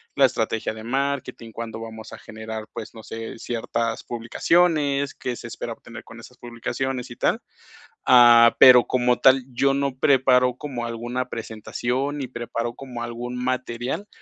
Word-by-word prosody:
la 140 - +6
estrategia 110 -3 -1
de 110 0 -10
marketing, 135 -2 -3
cuándo 115 0 -6
vamos 110 -1 -9
a - - -8
generar, 110 0 -8
pues, 110 - -8
no 110 - -11
sé, 115 +1 -7
ciertas 115 -1 -3
publicaciones, 140 +4 +1
qué 125 -1 -4
se - - -9
espera - - -6
obtener - - -12
con - - -13
esas - - -14
publicaciones 120 +2 -4
y - - -8
tal. - - 0 0.6
Ah, 120 -2 +7
pero 125 -2 +9
como 125 -1 +1
tal, 130 -1 +5
yo 135 +3 +2
no 140 -1 -1
preparo 125 -2 +3
como 130 -4 -5
alguna 120 +2 -4
presentación 120 +4 -3
ni 140 -3 -4
preparo 120 -1 -4
como 125 -3 -8
algún 120 +1 -5
material 130 - -3
120 Hz, 155 wpm, -23 LUFS, 115-130 Hz, 0.6 s, pero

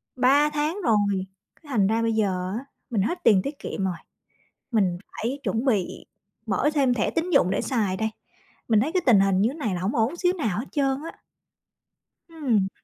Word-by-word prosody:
Ba 275 +4 +4
tháng 300 +5 -1
rồi, 200 - +1 0.3
cái - - -31
thành 205 -7 +2
ra 225 +2 +1
bây 230 0 +1
giờ 185 -4 0
á, 270 - -11 0.2
mình 220 -5 0
hết 345 - -2
tiền 200 -4 +5
tiết 280 +7 -6
kiệm 195 - -4
rồi, 185 - -1 0.8
mình 190 -6 +2
phải 250 +5 -3
chuẩn 225 +5 -1
bị 210 -9 -1 0.4
mở 215 +9 +1
thêm 270 -4 +3
thẻ 220 - 0
tín 335 +2 -2
dụng 185 - +4
để - - 0
xài 210 -7 0
đây. 220 +2 -1 0.6
Mình 220 -3 +4
thấy 300 +8 -1
cái 370 -1 +1
tình 225 -6 +6
hình 195 -1 +3
như 210 - +3
thế 265 - -5
này 265 - -2
là 175 - -3
hổng 190 +5 -1
ổn 235 +8 +1
xíu 355 +1 +2
nào 220 - -2
hết 240 - -3
trơn 275 0 0
á. - - -26 1.1
Ừm. 255 - 0
230 Hz, 205 wpm, -25 LUFS, 195-285 Hz, 1.1 s, tình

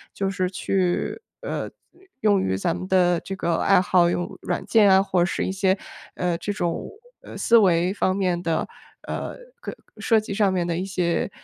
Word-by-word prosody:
就 195 -1 -1
是 185 -1 -1
去， 185 - -1 0.2
呃， - - -4 0.5
用 205 -4 +3
于 95 0 -1
咱 165 - -1
们 185 +1 -6
的 180 -2 +3
这 195 - -6
个 170 -3 -1
爱 195 - +4
好， 180 -1 +3
用 175 0 -3
软 175 - -3
件 215 -3 +5
啊， 190 0 +6
或 185 -3 +1
是 175 - -1
一 - - -2
些， 190 0 +1 0.4
呃， 180 -1 -1
这 205 - -3
种， 175 -5 -3 0.3
呃， - - -10
思 235 - +3
维 180 -2 +3
方 190 -2 0
面 180 -3 0
的， 165 -2 -1 0.4
呃， - - -4 0.3
可 - - -6 0.2
设 225 -2 +3
计 215 -1 -6
上 200 -1 +2
面 180 -2 0
的 170 -1 -1
一 180 - -2
些 180 -2 -1
185 Hz, 205 characters per minute, -23 LUFS, 175-195 Hz, 0.5 s, 啊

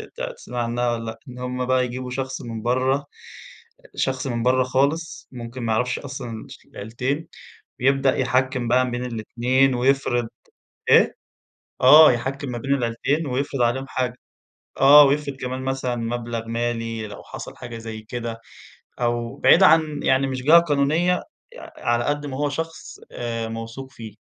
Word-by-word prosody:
ت - - -8 0.2
تسمعي 120 - -4
عنّها 120 +1 0
والّا 115 -1 -3
لأ، 110 0 -6
إن 125 0 -10
هُم 125 0 -3
بقى 130 0 +2
يجيبوا 125 +1 -5
شخص 130 0 -4
من 115 -2 -6
برّا 130 +3 +1
أ 145 - -9 0.9
شخص 130 0 -1
من 120 -2 -2
برّا 130 +1 +3
خالص 140 +6 -1
ممكن 120 0 -7
ما 110 -1 0
يعرفش 125 +3 0
أصلًا 120 -5 -7
شل - - -14
العيلتين 125 +9 -4 0.5
ويبدأ 135 0 +3
يحكّم 130 -1 0
بقى 125 +1 +2
بين 125 +1 -3
الاتنين 125 +3 +1
ويفرض 125 -2 +1 0.6
إيه؟ - - +5 0.7
آه، 150 +3 +9
يحكّم 135 +3 -3
ما 120 - -4
بين 135 +4 -1
العيلتين 135 +5 -1
ويفرض 135 0 -2
عليهم 125 +3 +1
حاجة، 125 -1 -2 0.6
آه 145 +2 +9
ويفرض 140 0 0
كمان 130 0 -4
مثلًا 130 -2 -2
مبلغ 115 -1 -4
مالي 115 -1 -3
لو 105 - -10
حصل - - -9
حاجة 120 -1 -8
زي 110 -1 -7
كده 115 0 -6 0.6
أو 120 -1 -1
بعيد 185 - +5
عن 155 -4 +4
يعني 135 +1 +2
مش 130 -1 -4
جهة 160 +5 +7
قانونية 160 +3 +1 0.3
يع - - -11
على 120 0 0
قد 145 0 -1
ما 130 -2 -5
هو 145 +1 0
شخص 165 +3 -6
آآ، 115 -1 -4
موثوق 115 +4 -7
فيه. 110 -2 -9
125 Hz, 160 wpm, -23 LUFS, 120-135 Hz, 0.9 s, آه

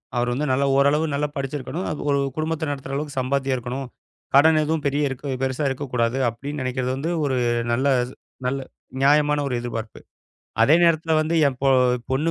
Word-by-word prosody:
அவர் 120 0 +1
வந்து 150 +4 -1
நல்ல 135 +2 +2
ஓரளவு 145 +3 +3
நல்லா 150 +1 -1
படிச்சிருக்கணும், 140 +5 -4 0.2
ஒரு 140 0 +2 0.2
குடும்பத்த 160 0 -2
நடத்துற 135 -1 -6
அளவுக்குச் 145 -1 -3
சம்பாத்தியம் 135 0 0
இருக்கணும், 125 +2 -5 0.5
கடன் 155 +2 +6
எதுவும் 155 -1 -1
பெரிய 145 +1 0
இருக் 135 +2 -7 0.2
பெருசா 130 +2 -1
இருக்கக் 135 0 -5
கூடாது 120 +1 +1
அப்படின்னு 140 +5 -6
நெனைக்கறது 130 0 -2
வந்து 160 +5 -2
ஒரு 135 -2 0 0.4
நல்ல 130 +4 +1 0.6
நல்ல 135 +2 0 0.4
நியாயமான 150 +1 +4
ஒரு 130 - -3
எதிர்பார்ப்பு. 115 -2 -6 0.6
அதே 145 +8 +6
நேரத்துல 165 -1 +3
வந்து 155 +2 0
என் 135 -2 -1
பொ 135 - +3 0.4
பொண்ணு 150 +5 +1
140 Hz, 165 wpm, -23 LUFS, 130-150 Hz, 0.6 s, கடன்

